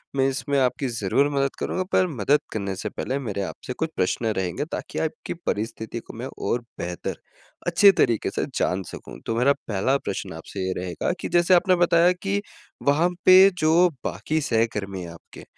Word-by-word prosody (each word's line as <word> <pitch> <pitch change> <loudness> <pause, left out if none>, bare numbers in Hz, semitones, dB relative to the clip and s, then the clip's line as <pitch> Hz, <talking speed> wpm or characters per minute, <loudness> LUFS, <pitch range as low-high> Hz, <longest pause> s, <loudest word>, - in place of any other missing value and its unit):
मैं 135 0 +3
इसमें 140 +1 -1
आपकी 130 +1 +1
ज़रूर 120 +5 +1
मदद 140 -1 0
करूँगा 185 - -1
पर 185 - +3
मदद 140 - +2
करने 100 -3 -3
से 95 - -4
पहले 135 +2 -3
मेरे 105 -7 -3
आपसे 125 - -6
कुछ 160 +4 -2
प्रश्न 95 +5 0
रहेंगे 95 - -2
ताकि - - -5
आपकी 160 - -3
परिस्थिति 110 +2 -3
को - - -12
मैं 125 +3 -4
और 120 - -1 0.2
बेहतर 90 0 -4 0.5
अच्छे 200 -1 +7
तरीके 115 - +1
से - - -1
जान 95 +1 0
सकूँ। - - -10
तो 115 - -1
मेरा 130 +4 +4
पहला 110 +6 +1
प्रश्न 100 -10 -5
आपसे 95 +4 -6
ये 95 - -1
रहेगा 90 - -2
कि - - -4
जैसे 175 +1 +4
आपने 185 +1 +5
बताया 175 0 +4
कि 200 +1 0 0.5
वहाँ 160 +5 +4 0.2
पे 185 +1 +9
जो 165 +3 +5 0.2
बाकी 110 - -1
सहकर्मी 105 -7 -1
हैं 85 - -8
आपके 85 - -13
125 Hz, 180 wpm, -24 LUFS, 100-160 Hz, 0.5 s, पे